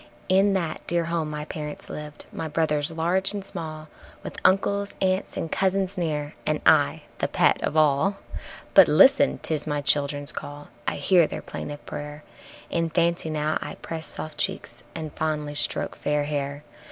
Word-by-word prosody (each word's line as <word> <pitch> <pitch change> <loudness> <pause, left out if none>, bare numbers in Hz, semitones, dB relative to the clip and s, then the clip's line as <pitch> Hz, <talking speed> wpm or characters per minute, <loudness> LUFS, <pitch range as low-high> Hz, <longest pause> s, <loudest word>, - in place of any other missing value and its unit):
In 195 +2 +4
that 170 -5 -2
dear 170 -1 +1
home 165 -2 -1
my 150 0 -5
parents 150 -1 -6
lived, 150 -1 -8
my 160 - -4
brothers 150 -1 0
large 175 +5 +1
and 200 -1 -5
small, 155 -5 -7 0.4
With - - -7
uncles, 200 +1 +2
aunts 190 0 0
and 165 - -3
cousins 195 0 0
near, 150 -4 -2
and - - 0
I - - +4 0.2
the - - +1
pet - - +2
of 155 - -1
all. 155 +6 +3 0.6
But - - +9
listen! 65 - +5
'tis 155 -1 0
my 150 -1 0
childrens' 145 0 +2
call, 145 0 -8 0.2
I - - 0
hear 170 +3 +4
their - - -6
plaintive 145 0 -7
prayer, 150 +1 -7 0.5
In 165 -1 0
fancy 170 0 +1
now 155 0 0
I - - -6
press 160 -1 -6
soft 155 - -5
cheeks - - -2
and 155 -2 -5
fondly 150 -2 -2
stroke 150 - +2
fair 150 0 0
hair. 145 0 -3
155 Hz, 165 wpm, -25 LUFS, 150-175 Hz, 0.6 s, But